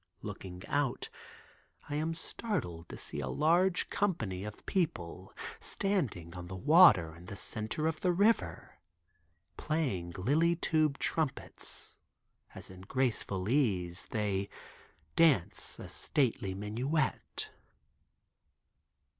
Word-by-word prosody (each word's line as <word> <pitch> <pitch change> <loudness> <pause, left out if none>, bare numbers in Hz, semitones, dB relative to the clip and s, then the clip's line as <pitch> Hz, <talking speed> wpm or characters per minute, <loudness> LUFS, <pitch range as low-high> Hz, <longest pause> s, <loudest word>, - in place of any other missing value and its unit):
Looking 90 -1 -7
out 145 -3 0 0.8
I 145 - -5
am 160 +2 0
startled 145 - -3
to - - -7
see - - -4
a 70 - -2
large 175 - +3
company 115 - 0
of 105 0 -8
people 95 - -2 0.3
standing 120 - -1
on 90 -1 -7
the 95 - -6
water 130 - +7
in 85 +1 -13
the 100 - -6
center 110 +9 -2
of 160 -1 0
the 180 - +3
river 205 +6 +1 0.8
playing 125 - -1
lily 155 - +3
tube 155 -4 +2
trumpets 155 -5 -3 0.6
as - - -8
in 95 0 -11
graceful 100 -4 -1
ease 95 -9 +1
they 100 -2 -1 0.7
dance 150 - +3
a - - -8
stately 115 -9 0
minuet. 125 +9 -2
125 Hz, 110 wpm, -32 LUFS, -, 0.8 s, water